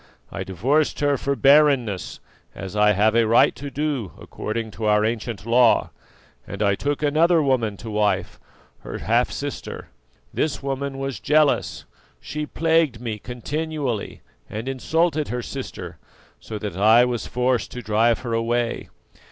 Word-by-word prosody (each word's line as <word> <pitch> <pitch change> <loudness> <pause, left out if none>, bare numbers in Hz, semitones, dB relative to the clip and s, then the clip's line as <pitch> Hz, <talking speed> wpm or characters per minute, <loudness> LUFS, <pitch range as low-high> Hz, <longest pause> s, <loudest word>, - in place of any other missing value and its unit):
I - - -4
divorced 130 - 0
her 145 -1 +3
for 140 +1 -1
barrenness, 135 -8 +3 0.4
as 95 +1 -7
I 105 0 +4
have 105 +2 +3
a 115 -1 +4
right 115 - +5
to 140 +1 -7
do 140 - -3
according 110 0 -5
to 110 +1 -5
our 105 0 +3
ancient 115 -1 -3
law, 120 0 +4 0.6
and 100 +1 -3
I 100 -1 +3
took 145 +8 -2
another 160 +4 +4
woman 125 -8 +1
to 115 - -8
wife, 105 -1 0 0.4
her - - -7
half - - +1
sister. - - -6 0.4
This 140 -3 -1
woman 135 0 -3
was 135 -1 -4
jealous; 150 -1 +1 0.3
she 150 0 -5
plagued 160 -7 +1
me 115 -3 -4
continually, 140 0 -4 0.3
and 110 +4 -5
insulted 155 +4 0
her 125 0 -3
sister, 135 +1 -7 0.4
so 110 - -7
that 105 -4 -5
I 110 +5 +6
was 120 -2 -3
forced 125 0 0
to 125 - -7
drive 110 +2 +2
her 120 -2 -4
away. 115 +1 -1
125 Hz, 150 wpm, -23 LUFS, 110-145 Hz, 0.6 s, I